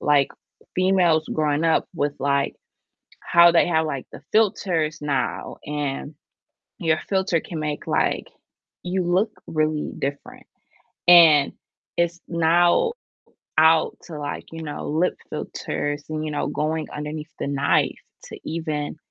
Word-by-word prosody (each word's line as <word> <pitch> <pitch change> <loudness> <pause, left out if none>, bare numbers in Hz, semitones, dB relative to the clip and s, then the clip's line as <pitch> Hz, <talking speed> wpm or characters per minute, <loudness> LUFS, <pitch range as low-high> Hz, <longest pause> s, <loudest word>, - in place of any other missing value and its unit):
like, 145 -2 +3 0.5
females 180 -4 +3
growing 150 0 +1
up 160 - +2
with, 145 -1 0
like, 140 0 +1 0.7
how 170 0 +6
they 170 - +4
have, 160 -2 +2
like, 140 -4 -4
the - - -11
filters 180 -8 +1
now 145 -3 -2
and 145 0 -4 0.6
your 160 -2 +2
filter 190 -4 +1
can 165 -3 -6
make, 150 -1 -4
like, - - 0 0.6
you 180 +1 -1
look 185 +5 +1 0.2
really 155 -1 -1
different, 140 +1 -5 0.6
and 160 -5 +7 0.4
it's 170 0 0
now 175 - +3 0.7
out 160 0 +5
to, 160 -3 -8
like, 145 0 -5
you 165 0 -7
know, 150 - -5
lip 160 +5 +1 0.2
filters 145 0 -4
and, 155 0 -3
you 155 - -3
know, 145 - -1
going 155 +1 -2
underneath 150 +1 -6
the - - -3
knife 140 0 +2 0.3
to - - -9
even 155 -3 -3
155 Hz, 130 wpm, -23 LUFS, 150-170 Hz, 0.7 s, and